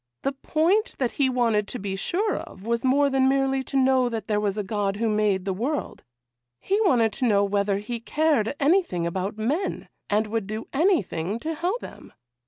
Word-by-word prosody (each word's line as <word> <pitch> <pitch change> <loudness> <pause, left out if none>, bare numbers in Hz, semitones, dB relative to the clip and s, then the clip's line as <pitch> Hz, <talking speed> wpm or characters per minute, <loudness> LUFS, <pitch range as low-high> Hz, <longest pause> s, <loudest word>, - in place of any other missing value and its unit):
The 275 - +1
point 330 - +1
that 250 -3 0
he 275 -2 +1
wanted 230 -5 +1
to 250 - -4
be 195 -3 -4
sure 395 - -1
of 190 - -10
was 235 0 -1
more 280 +2 +3
than 265 0 +3
merely 270 0 +1
to 275 - -2
know 260 -1 +3
that 225 -3 -4
there 210 -2 +1
was 205 -1 -1
a 210 - -1
God 200 0 -1
who 225 +2 -1
made 210 -3 +1
the 195 - -1
world; 260 +10 -3 0.6
he 400 +3 0
wanted 235 - +3
to 250 - 0
know 200 -2 +3
whether 200 0 +1
He 230 +4 -5
cared 285 -1 +1
anything 290 - +2
about 190 +4 -3
men, 285 - -2 0.2
and 210 +1 +2
would 215 -2 -3
do 215 +1 -5
anything 225 - +1
to 325 +1 -2
help 360 +9 -2
them. - - -11
230 Hz, 195 wpm, -25 LUFS, 205-280 Hz, 0.6 s, more